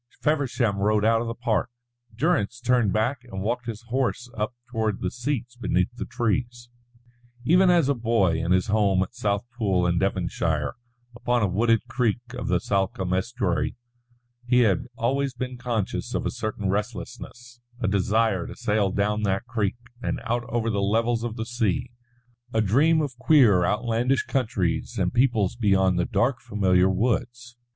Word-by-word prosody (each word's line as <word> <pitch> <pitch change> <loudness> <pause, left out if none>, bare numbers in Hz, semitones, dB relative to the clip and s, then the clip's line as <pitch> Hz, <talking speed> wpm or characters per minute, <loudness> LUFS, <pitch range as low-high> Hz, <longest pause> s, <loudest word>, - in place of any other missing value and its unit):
Feversham 135 -8 0
rode 105 +1 +2
out 115 0 +3
of 120 - -3
the 115 - -4
park, 120 -2 0 0.5
Durrance 125 - 0
turned 125 -4 +2
back 120 +5 0
and 95 -5 -6
walked 120 +3 -2
his 115 -1 -5
horse 125 -1 -1
up 110 +3 -3 0.2
toward 110 -3 -1
the 90 - -2
seats 125 -1 -3
beneath 120 -2 0
the - - -5
trees. 120 0 -2 0.8
Even 180 +5 +5
as 170 -5 +4
a 140 - +3
boy 115 -9 +1
in 85 - -1
his 95 0 +3
home 100 -3 +2
at 95 - -9
Southpool 105 -4 0
in 85 0 +1
Devonshire, 85 -5 -1 0.4
upon 120 -1 0
a - - +3
wooded 115 +5 +2
creek 120 -2 0
of 125 - -5
the 90 - +2
Salcombe 95 -1 -1
estuary, 95 -4 -1 0.7
he 125 0 +4
had 105 -2 +2
always 135 +3 0
been 125 +1 -4
conscious 120 -4 -3
of - - -1
a - - 0
certain 105 -2 -3
restlessness, 120 +5 -5 0.2
a 115 - -1
desire 100 0 +1
to - - -8
sail 105 -2 +1
down 105 +2 0
that 100 +1 0
creek 110 -5 -1 0.3
and - - -2
out 120 0 -1
over 115 -1 0
the 100 -2 0
levels 115 +3 +1
of 120 -2 -3
the 110 -2 -4
sea, 115 -1 -1 0.6
a 110 - +2
dream 145 +10 +3
of 140 -4 -3
queer 125 - +5
outlandish 115 +6 +1
countries 105 -10 -1
and - - 0
peoples 120 -6 +2
beyond 95 -5 +2
the 90 - +1
dark 120 0 +1
familiar 95 -5 +2
woods. 120 +4 -1
115 Hz, 165 wpm, -25 LUFS, 100-125 Hz, 0.8 s, Even